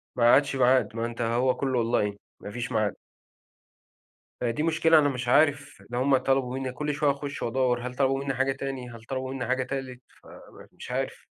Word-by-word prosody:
ما 120 - 0
عادش 140 0 +3
ميعاد، 125 -4 +3
ما 115 - -1
أنت 120 0 -5
هو 120 +3 +1
كله 130 -3 0
online، 105 -3 0 0.2
ما 100 - -8
فيش 120 +2 -5
ميعاد. 110 -2 0 1.5
فدي 120 +5 -1
مشكلة 160 0 +4
أنا 145 -1 +3
مش 125 -2 -4
عارف 145 +2 +2
لو 120 +1 -2
هُم 135 0 +4
طلبوا 130 -1 0
مني 130 -1 -3
كل 150 +3 -3
شوية 145 0 +2
أخش 140 0 -5
وأدوَّر، 125 0 0
هل 125 - -8
طلبوا 135 0 +1
منِّي 135 - -2
حاجة 135 +1 +1
تاني 135 -2 -5
هل 115 -1 -11
طلبوا 130 +1 -4
مني 135 -2 -3
حاجة 130 0 +1
تالت 130 -1 -5 0.7
فمش - - -10
عارف. - - -3
130 Hz, 190 wpm, -27 LUFS, 120-135 Hz, 1.5 s, مشكلة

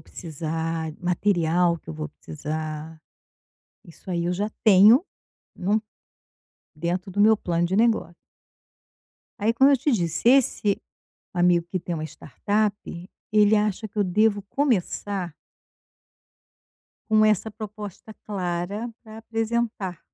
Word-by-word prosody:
precisar, 160 0 -4
material 175 -1 +2
que - - -25
eu - - -6
vou 155 0 -5
precisar, 155 +1 -6 0.9
isso 175 +2 -10
aí 170 -1 -1
eu 175 - 0
já 205 +4 -2
tenho, 215 - +7 0.6
não, 205 +4 0 0.9
dentro 175 +4 -3
do 195 +2 -5
meu 220 +2 +6
plano 175 -4 -1
de 180 +2 -1
negócio. 220 -6 +2 1.2
Aí 215 +2 +2
como 265 +4 +5
eu 280 - +5
te 280 +3 0
disse, 170 -3 -1
esse 235 -6 +2 0.5
amigo 175 -1 +3
que 185 - -1
tem 175 0 -4
uma 155 - -4
startup, 205 +8 -1 0.6
ele 210 0 +5
acha 210 0 0
que 210 - -15
eu 205 - +3
devo 205 +2 +2
começar 200 - -1 1.8
com 215 0 +5
essa 215 0 +2
proposta 210 0 -8
clara 195 +3 -3
para 220 -1 -11
apresentar 225 -4 -2
195 Hz, 120 wpm, -24 LUFS, 170-215 Hz, 1.8 s, tenho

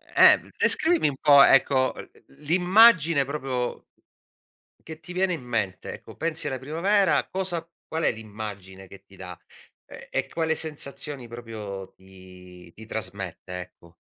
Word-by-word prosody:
Eh - - +8 0.2
descrivimi 325 - +2
un 135 - -7
po', 145 -2 +7
ecco, 130 -1 +4
l - - -10 0.3
l'immagine 175 -2 +5
proprio 130 -3 -4 1.0
che 160 -1 -8
ti 175 +2 -10
viene 185 0 +1
in 165 - -5
mente 110 -6 -3
ecco, - - -12
pensi 160 -1 -2
alla 130 -3 -3
primavera, 185 +8 +1
cosa 180 -3 -3 0.2
qual 160 0 -3
è - - +3
l'immagine 100 -4 -9
che 100 -1 -14
ti 100 0 -18
da? 90 -2 -9 0.5
Ehm - - -12
e - - -2
quale 160 -1 -1
sensazioni 145 -4 -6
proprio 105 -5 -8
ti 90 -2 -16
ti 110 - -12
trasmette, 95 -4 -6
ecco? 85 -1 -15
130 Hz, 140 wpm, -25 LUFS, 95-160 Hz, 1.0 s, Eh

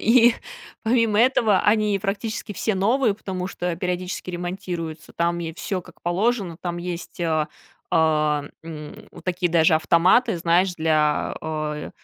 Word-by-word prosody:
И 235 0 +6 0.5
помимо 225 -2 +2
этого, 230 -4 +4
они 210 -1 +3
практически 205 +2 -3
все 215 +1 -1
новые, 225 +4 +2
потому 185 -3 -5
что 175 -2 -3
периодически 180 +1 -3
ремонтируются, 175 -3 -5
там 170 0 0
е 165 -1 -4
всё 185 +2 -3
как 180 -1 -17
положено. 190 0 0
Там 175 -1 -3
есть, 175 0 -6
э, 160 -3 +1 0.4
а, 155 -3 +2 0.2
м, 155 -2 -9
вот - - -14
такие 180 -1 0
даже 160 -1 +4
автоматы, 170 +7 +4
знаешь, 175 +2 +2
для, 155 -2 +1
э, 155 -1 -4
180 Hz, 140 wpm, -23 LUFS, 165-205 Hz, 0.5 s, И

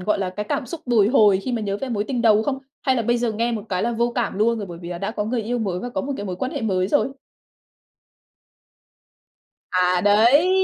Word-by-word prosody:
gọi 205 +2 0
là, 190 -2 -2
cái 210 +3 -5
cảm 280 - -1
xúc 335 +3 -7
bồi 225 -5 +4
hồi 210 -6 +5
khi 255 - -2
mà 235 - -1
nhớ 200 -1 -2
về 270 - -5
mối 210 -4 -1
tình 245 0 -2
đầu 220 -2 +5
không? 270 +2 -2 0.2
Hay 260 -2 +2
là 235 - 0
bây 240 +2 +1
giờ 235 -2 0
nghe 235 +2 -1
một 215 -3 -3
cái 185 -1 -1
là 235 - 0
vô 235 +1 0
cảm 235 -5 -2
luôn 230 +2 +2
rồi, 205 - -5
bởi 170 -2 -9
vì 170 - -8
là 175 -1 -5
đã 200 +3 -3
có 210 -2 -3
người 230 +1 -1
yêu 240 +3 -2
mới 190 -5 -2
và 245 - -4
có - - -2
một 280 +1 -3
cái 205 - -5
mối 180 - -4
quan 260 +7 -3
hệ - - -3
mới 185 -4 0
rồi. 270 +2 +1 2.6
À, 180 0 +2
đấy, 235 - +5
220 Hz, 260 wpm, -22 LUFS, 200-240 Hz, 2.6 s, hồi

